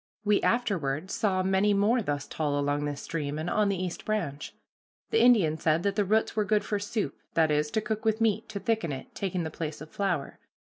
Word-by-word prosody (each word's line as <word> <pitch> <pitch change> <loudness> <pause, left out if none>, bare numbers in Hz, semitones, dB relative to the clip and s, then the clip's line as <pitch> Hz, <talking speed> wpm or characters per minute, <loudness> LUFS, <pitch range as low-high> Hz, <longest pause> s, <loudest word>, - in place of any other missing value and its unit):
We 205 0 +3
afterward 185 - 0
saw 185 -3 +1
many 190 +2 +3
more 220 +5 +3
thus 145 -7 -2
tall 145 -2 -1
along 145 +1 0
this 145 -1 -4
stream, 150 -3 -3
and 155 +2 -3
on 210 -1 +2
the 195 - 0
East 180 -1 -4
Branch. 175 -10 -2 0.6
The 450 - +4
Indian 190 -11 +5
said 160 +1 +2
that 200 - 0
the 210 - +2
roots 215 +4 +1
were 215 - +2
good 210 0 +1
for 210 - -1
soup, 205 -7 -2 0.2
that 160 -2 +4
is, 150 0 +1
to 220 - 0
cook 220 0 -3
with 220 0 +1
meat, 220 -1 +1
to 200 - -4
thicken 200 -5 0
it, 135 - -7
taking 185 -3 -2
the 160 - -4
place 155 -1 -5
of 155 +1 -10
flour. 180 -8 -2
190 Hz, 220 wpm, -28 LUFS, 150-210 Hz, 0.6 s, Indian